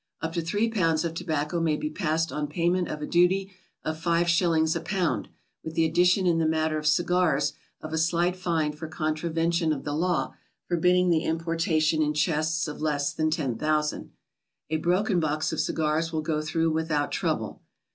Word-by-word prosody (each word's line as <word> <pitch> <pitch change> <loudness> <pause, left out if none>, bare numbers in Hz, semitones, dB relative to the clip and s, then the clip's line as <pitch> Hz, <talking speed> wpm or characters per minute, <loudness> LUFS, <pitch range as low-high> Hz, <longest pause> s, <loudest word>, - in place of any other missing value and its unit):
Up 160 0 -4
to 170 - -1
three 205 +7 0
pounds 165 -7 +1
of 165 - -2
tobacco 155 0 -2
may 155 -2 +1
be 150 - -3
passed 165 -1 -1
on 150 -1 -2
payment 175 +3 0
of 150 - -5
a - - -1
duty 185 +3 +2 0.3
of 155 0 -3
five 170 +1 +1
shillings 165 -2 +2
a - - -2
pound, 170 - -1 0.4
with 160 0 -6
the 165 -1 +3
addi 175 +2 +3
tion 185 +1 +3
in 170 -2 +3
the 160 - +2
matter 155 -1 0
of 150 - -3
cigars 160 -2 +2 0.3
of 155 0 -7
a 160 - +1
slight 170 +2 +1
fine 165 -4 0
for 155 +2 -8
contravention 165 +1 0
of 145 -3 -2
the 145 - -3
law 175 +2 0 0.3
forbidding 180 +1 +3
the 160 -1 +2
importation 165 -1 +1
in 150 0 +1
chests 160 +1 0
of 150 - -7
less 145 -2 0
than 155 0 0
10,000. 150 0 -1 0.6
A 160 - +2
broken 180 +4 +1
box 155 -1 -1
of - - -3
cigars 160 +1 0
will 160 -1 -2
go 155 -1 -1
through 160 +1 0
without 155 -2 -1
trouble. - - -2
160 Hz, 185 wpm, -26 LUFS, 155-170 Hz, 0.6 s, the